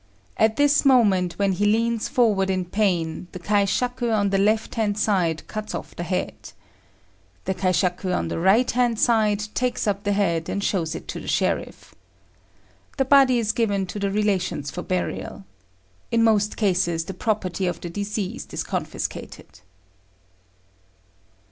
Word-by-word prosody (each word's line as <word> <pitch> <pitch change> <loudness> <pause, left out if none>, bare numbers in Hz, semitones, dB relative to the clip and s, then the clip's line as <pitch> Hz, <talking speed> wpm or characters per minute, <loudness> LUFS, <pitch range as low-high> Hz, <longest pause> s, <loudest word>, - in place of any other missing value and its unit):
At 220 0 +2
this 290 0 +3
moment, 205 - +4
when 200 -1 +1
he 195 +3 0
leans 230 +1 +1
forward 210 -6 +2
in 185 -1 0
pain, 180 -4 -1
the 185 - -6
kaishaku 210 +6 0
on 205 -2 +1
the 195 - +2
left 215 +2 +1
hand 210 -2 0
side 180 -7 0
cuts 215 0 -5
off - - -7
the - - -5
head. 180 +1 -4 0.9
The 190 - 0
kaishaku 185 0 0
on 180 - -1
the - - -3
right 195 +8 +3
hand 240 -2 +1
side 215 -4 +3
takes 250 0 -1
up 200 -1 -1
the 205 - +1
head, 170 -5 0
and 200 - -2
shows 165 -6 -1
it - - -8
to - - -4
the - - -10
sheriff. - - -2 1.0
The 270 - +2
body 270 -2 +5
is 220 -2 +1
given 205 -4 0
to 185 +3 -6
the 200 0 0
relations 195 -8 -1
for 180 - -5
burial. 180 - -4 0.6
In 230 -1 +2
most 210 -2 +2
cases 180 -5 +1
the 195 - -6
property 190 -2 -1
of 175 -2 -2
the 175 - -6
deceased 205 0 -4
is - - -2
confiscated. - - -5
200 Hz, 155 wpm, -23 LUFS, 185-220 Hz, 1.0 s, body